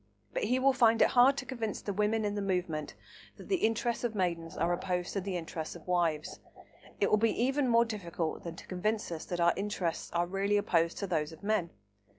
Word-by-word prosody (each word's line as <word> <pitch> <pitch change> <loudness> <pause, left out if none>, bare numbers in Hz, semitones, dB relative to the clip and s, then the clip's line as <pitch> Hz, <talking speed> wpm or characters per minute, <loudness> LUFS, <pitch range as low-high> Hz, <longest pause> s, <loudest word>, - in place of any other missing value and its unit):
But - - -1
he 250 - +2
will 270 +1 +4
find 230 -3 +4
it - - +4
hard 255 +3 +5
to 275 - -3
convince 225 -6 -3
the 200 - -4
women 210 +2 +1
in 205 - -1
the 205 - -2
movement 180 -6 -2 0.4
that - - -12
the 380 - +3
interests 230 -3 0
of 235 -2 -1
maidens 170 -4 -2
are 175 - +1
opposed 180 0 -2
to 195 - -1
the 185 -1 -3
interests 160 -1 -5
of 170 - -12
wives. 170 -4 0 0.6
It - - +2
will 215 - +6
be 225 0 +1
even 270 +1 +1
more 235 0 +5
difficult 175 -7 -4
than 170 -1 -6
to - - -11
convince 210 +2 -2
us 160 -2 -5
that 175 - -4
our 170 0 +4
interests 195 -4 -2
are 175 0 +2
really 195 +3 +1
opposed 170 -4 +1
to 200 - -2
those 160 -4 -1
of 160 - -14
men. 200 -5 +1
195 Hz, 220 wpm, -31 LUFS, 170-225 Hz, 0.6 s, will